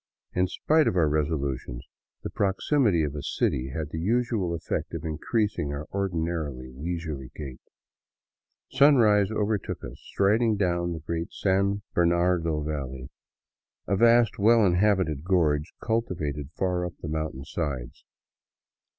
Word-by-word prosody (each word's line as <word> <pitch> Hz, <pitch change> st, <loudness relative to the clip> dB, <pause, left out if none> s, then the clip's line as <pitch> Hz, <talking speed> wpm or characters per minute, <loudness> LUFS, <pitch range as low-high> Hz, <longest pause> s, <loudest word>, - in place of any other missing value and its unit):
In 90 Hz, +1 st, +2 dB
spite 155 Hz, -, +2 dB
of -, -, +1 dB
our 85 Hz, -4 st, +3 dB
resolutions, 70 Hz, -4 st, -2 dB, 0.4 s
the -, -, -5 dB
proximity 100 Hz, -, +2 dB
of 75 Hz, -2 st, -2 dB
a 75 Hz, -, -5 dB
city 65 Hz, -1 st, -1 dB
had 75 Hz, +2 st, -4 dB
the 80 Hz, -, -4 dB
usual 110 Hz, -2 st, 0 dB
effect 85 Hz, -, -4 dB
of 80 Hz, -, -5 dB
increasing 80 Hz, 0 st, -1 dB
our 70 Hz, +1 st, -5 dB
ordinarily 80 Hz, -9 st, -2 dB
leisurely 75 Hz, -2 st, -5 dB
gait. 70 Hz, -4 st, -8 dB, 1.1 s
Sunrise 110 Hz, -9 st, +5 dB
overtook 105 Hz, -2 st, -2 dB
us -, -, -8 dB
strid 100 Hz, +4 st, +1 dB
ing 115 Hz, -2 st, +3 dB
down 85 Hz, -3 st, 0 dB
the 80 Hz, -, -6 dB
great 85 Hz, +2 st, -4 dB
San 100 Hz, +1 st, 0 dB
Bernardo 85 Hz, -2 st, +2 dB
valley, 65 Hz, -4 st, -5 dB, 0.8 s
a 100 Hz, -, +2 dB
vast, 115 Hz, +1 st, +4 dB
well 110 Hz, +1 st, +5 dB
inhabited 90 Hz, -5 st, +2 dB
gorge, 80 Hz, -4 st, +1 dB
cultivated 75 Hz, -, -2 dB
far 90 Hz, -2 st, 0 dB
up 90 Hz, -1 st, -4 dB
the -, -, -3 dB
mountain 80 Hz, -4 st, -3 dB
sides. 70 Hz, -7 st, -4 dB
85 Hz, 135 wpm, -26 LUFS, 75-100 Hz, 1.1 s, Sunrise